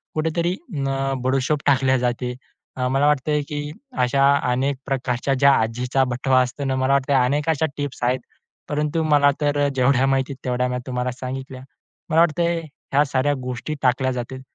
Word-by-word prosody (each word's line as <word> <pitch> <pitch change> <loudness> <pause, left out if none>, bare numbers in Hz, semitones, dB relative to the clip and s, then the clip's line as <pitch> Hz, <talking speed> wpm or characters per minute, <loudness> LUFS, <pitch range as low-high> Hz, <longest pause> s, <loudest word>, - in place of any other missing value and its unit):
कुठेतरी 170 +3 0 0.2
न 135 -1 -1
बडिशेप 135 +3 +1
टाकले 130 -1 +3
जाते. 125 0 -1 0.5
अ, 125 0 0
मला 135 +2 +2
वाटतंय, 150 +1 +1
की 150 - -4 0.5
अशा 135 +2 +3 0.3
अनेक 135 +2 0
प्रकारच्या 135 -1 -1
ज्या 140 0 +6
आजीचा 125 +4 0
बटवा 130 +1 +2
असतो 125 +3 -3
ना, 135 - 0
मला 130 +1 +1
वाटतंय 140 0 +2
अनेक 140 +5 +2
अशा 160 0 +2
टिप्स 145 -4 -4
आहेत. 125 +1 +1 0.5
परंतु 150 +2 0
मला 145 -2 +4
तर 145 0 +1
अ, - - +3
जेवढ्या 130 0 +3
माहिती 135 +1 +1
आहेत, 130 - -13
तेवढ्या 125 0 0
तुम्हाला 125 0 -2
सांगितल्या. 130 0 -6 0.5
मला 160 - +3
वाटतंय 170 +1 +1 0.3
ह्या 145 - +5
साऱ्या 135 +1 +1
गोष्टी 125 +4 -4
टाकल्या 130 +1 +2
जातील. 130 +1 -5
135 Hz, 165 wpm, -22 LUFS, 125-145 Hz, 0.5 s, ज्या